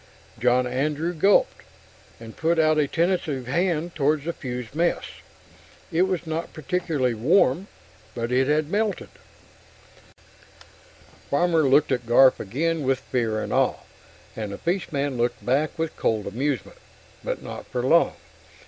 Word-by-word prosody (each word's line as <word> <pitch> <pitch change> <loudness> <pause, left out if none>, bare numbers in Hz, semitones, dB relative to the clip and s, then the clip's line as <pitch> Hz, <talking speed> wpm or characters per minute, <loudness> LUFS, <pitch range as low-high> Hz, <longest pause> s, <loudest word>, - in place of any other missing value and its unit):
John 125 +2 +3
Andrew 150 +7 -1
gulped, 195 +5 +3 0.6
and 115 -1 -11
put 165 +1 +1
out 155 -1 +3
a 145 - +2
tentative 165 -5 -1
hand 170 +4 -1
toward 150 0 +1
the 170 +2 -3
fused 125 -4 -6
mess. 170 +3 0 0.9
It 175 +3 +2
was 180 -3 -2
not 160 +1 -4
particularly 155 -5 -1
warm 140 - +2 0.5
but 120 0 -3
it 130 +1 +2
had 150 +1 +1
melted. 210 -1 -1 2.2
Farmer 160 -1 +2
looked 145 +2 +4
at 125 -3 -1
Garf 130 +2 +6
again 160 +10 -1
with 135 -1 +1
fear 115 -5 -1
and - - -4
awe, - - +2 0.6
and 105 -2 -5
the 100 - -6
fishman 145 -7 -2
looked 120 +1 -1
back 140 +7 0
with 165 -1 -3
cold 110 -2 0
amusement. 140 - -3 0.4
But - - -4
not - - -8
for - - -3
long. - - +3
150 Hz, 140 wpm, -24 LUFS, 125-165 Hz, 2.2 s, Garf